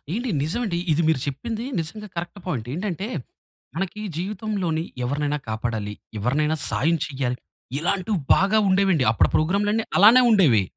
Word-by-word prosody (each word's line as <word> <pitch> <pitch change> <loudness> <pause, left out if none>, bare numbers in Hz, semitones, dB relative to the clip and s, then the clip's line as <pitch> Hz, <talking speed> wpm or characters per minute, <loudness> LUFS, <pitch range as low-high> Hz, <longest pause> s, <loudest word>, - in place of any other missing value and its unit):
ఏండి! 240 +1 -2
నిజం 165 +11 -1
అండి 170 -5 -1
ఇది 165 +3 +2
మీరు 160 -5 +2
చెప్పింది 225 - -4 0.2
నిజంగా 210 +7 -6
కరెక్ట్ 175 +4 -5
పాయింట్. 120 -10 -3
ఏంటంటే, 190 +3 -3 0.7
మనకి 195 +4 -3 0.2
జీవితంలోని 185 -3 -2 0.2
ఎవరినైనా 145 +3 -1
కాపాడాలి. 110 -2 -3 0.2
ఎవరినైనా 150 +8 +1
సాయం 165 +4 +2
చేయాలి. 130 -3 -3 0.4
ఇలాంటివి 190 +4 0 0.2
బాగా 200 +3 +3
ఉండేవండి. 190 -6 +3
అప్పుడు 110 - +3
ప్రోగ్రామ్‌లన్ని 205 +7 +1
అలానే 225 +6 +8
ఉండేవి. 155 - +5
170 Hz, 135 wpm, -23 LUFS, 145-205 Hz, 0.7 s, అలానే